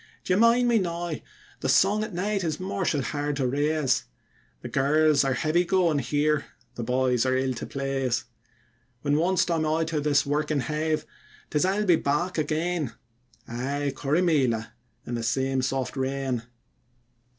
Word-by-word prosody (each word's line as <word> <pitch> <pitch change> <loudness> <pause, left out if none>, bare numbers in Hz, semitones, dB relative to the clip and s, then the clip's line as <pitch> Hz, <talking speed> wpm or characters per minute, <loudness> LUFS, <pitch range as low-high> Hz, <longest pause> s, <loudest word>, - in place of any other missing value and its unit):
D'ye 185 - +1
mind 230 +4 +4
me 235 -2 +4
now, 175 -2 -3 0.5
the - - -2
song 210 +3 +4
at 215 - -5
night 195 +2 -1
is 160 -3 -1
mortial 185 -6 -1
hard 145 +1 -2
to 135 -2 0
raise, 145 +1 +1 0.6
The - - -4
girls 150 +2 +3
are 135 -1 +1
heavy 155 +6 +2
goin' 175 -4 +2
here, 150 +1 +1 0.3
the 120 - -6
boys 125 0 +1
are 130 0 +1
ill 130 0 0
to 120 - -6
plase; 135 -3 -1 0.8
When 145 0 +2
ones't 175 +4 +2
I'm 165 -2 +1
out 160 +1 0
this 150 -2 +2
workin' 150 0 0
hive, 155 +1 -1 0.5
'tis 150 +3 +2
I'll 200 +3 +1
be 175 -4 +5
back 155 +5 -1
again 155 -2 -1 0.5
Aye, 140 +4 -2
Corrymeela 140 -7 +1 0.3
in 120 - -5
the 120 - -2
same 130 +3 0
soft 130 +1 -2
rain. 130 -3 -2
150 Hz, 150 wpm, -26 LUFS, 135-170 Hz, 0.8 s, be